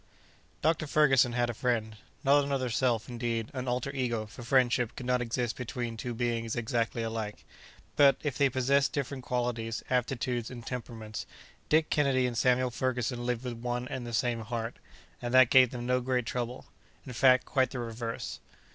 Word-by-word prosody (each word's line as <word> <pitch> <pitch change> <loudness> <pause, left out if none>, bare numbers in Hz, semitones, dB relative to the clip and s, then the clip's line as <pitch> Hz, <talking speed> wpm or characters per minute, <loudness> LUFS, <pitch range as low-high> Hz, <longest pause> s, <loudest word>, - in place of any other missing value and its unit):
Dr. 155 0 +2
Ferguson 135 -5 +4
had 120 0 +1
a - - -8
friend—not 120 +5 0
another 135 -3 -1
self, 115 -1 +1
indeed, 115 -2 -3
an 130 -1 -4
alter 125 +2 -1
ego, 120 -5 -1
for 105 +3 -11
friendship 120 -1 +2
could 125 - -7
not 125 0 +1
exist 120 0 -1
between 120 -1 -4
two 120 +1 -5
beings 115 -1 -1
exactly 115 -1 -1
alike. 110 -2 -4 0.5
But, 140 -2 +7
if 145 -4 -1
they 140 -1 +3
possessed 135 +2 +2
different 140 -2 -3
qualities, 120 -2 -2
aptitudes, 125 -1 0
and 120 -2 -9
temperaments, 115 -3 -6 0.4
Dick 155 +1 +3
Kennedy 135 -3 +3
and 125 -1 -2
Samuel 125 +1 +2
Ferguson 125 -1 -2
lived 120 0 -1
with 125 -2 -3
one 120 +1 -3
and 125 -2 -5
the - - -5
same 120 +1 0
heart, 115 +1 -4 0.5
and 120 +1 -1
that 130 -1 +7
gave 130 -2 +7
them 120 0 -6
no 125 +1 +2
great 125 -1 0
trouble. 120 +1 -4 0.4
In 130 - -7
fact, 130 +2 +5
quite 130 -2 +2
the 135 - -6
reverse. 115 -1 -4
125 Hz, 175 wpm, -30 LUFS, 115-130 Hz, 0.5 s, But